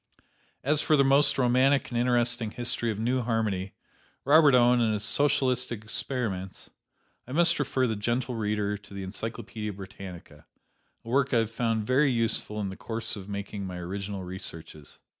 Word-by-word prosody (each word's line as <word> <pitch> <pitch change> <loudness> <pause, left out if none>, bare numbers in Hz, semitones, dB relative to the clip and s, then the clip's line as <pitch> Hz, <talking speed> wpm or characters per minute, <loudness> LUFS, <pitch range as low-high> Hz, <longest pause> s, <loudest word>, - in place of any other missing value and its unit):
As 150 +2 +2
for 155 - +3
the 140 - +5
most 140 +2 +4
romantic 130 +2 +3
and 120 - -2
interesting 120 -2 +1
history 120 0 -2
of 105 -2 -3
New 125 +3 +1
Harmony, 110 -5 -1 0.5
Robert 145 -1 +6
Owen 120 0 +5
and 110 -2 +2
his 105 -1 -2
socialistic 125 -3 +1
experiments, 110 -5 -4 0.6
I 130 - -7
must 170 +1 +3
refer 130 -2 +1
the 110 -3 -1
gentle 120 +5 -1
reader 105 -2 -1
to 100 0 -16
the 100 - -5
Encyclopedia 105 +1 -5
Britannica, 95 -2 -10 0.6
a - - -14
work 130 +1 +1
I - - +5
have 115 -1 +1
found 115 -2 -1
very 135 +5 +3
useful 115 -2 -1
in 100 -2 -2
the 95 - -7
course 115 -1 -3
of 100 -1 -9
making 100 -1 -5
my 90 -1 -6
original 95 +2 -5
researches. 85 -4 -8
115 Hz, 165 wpm, -27 LUFS, 100-125 Hz, 0.6 s, Robert